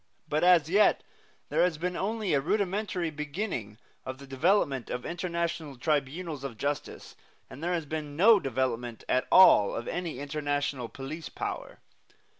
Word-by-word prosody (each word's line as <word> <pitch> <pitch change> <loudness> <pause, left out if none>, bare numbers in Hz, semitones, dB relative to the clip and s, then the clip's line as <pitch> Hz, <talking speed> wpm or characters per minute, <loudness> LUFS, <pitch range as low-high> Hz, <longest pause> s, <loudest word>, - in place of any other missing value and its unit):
But 155 +2 0
as 175 -4 +6
yet 200 +5 +4 0.5
there - - +2
has 175 -3 +2
been 180 +3 -2
only 210 -1 -1
a 140 - +3
rudimentary 190 0 -1
beginning 150 - -4 0.3
of 130 0 -6
the 140 - -11
development 135 - +1
of 125 - -4
international 170 -4 -3
tribunals 150 +2 -2
of 130 -5 -6
justice, 145 +2 -4 0.4
and 140 - -9
there 175 +1 0
has 165 -3 -2
been 150 -1 -5
no 210 +4 +7
development 125 - -2
at 130 - +1
all 105 - +7
of 120 - -5
any 175 -6 -3
international 145 -3 -2
police 145 +5 -7
power. - - -5
150 Hz, 150 wpm, -29 LUFS, 135-180 Hz, 0.5 s, no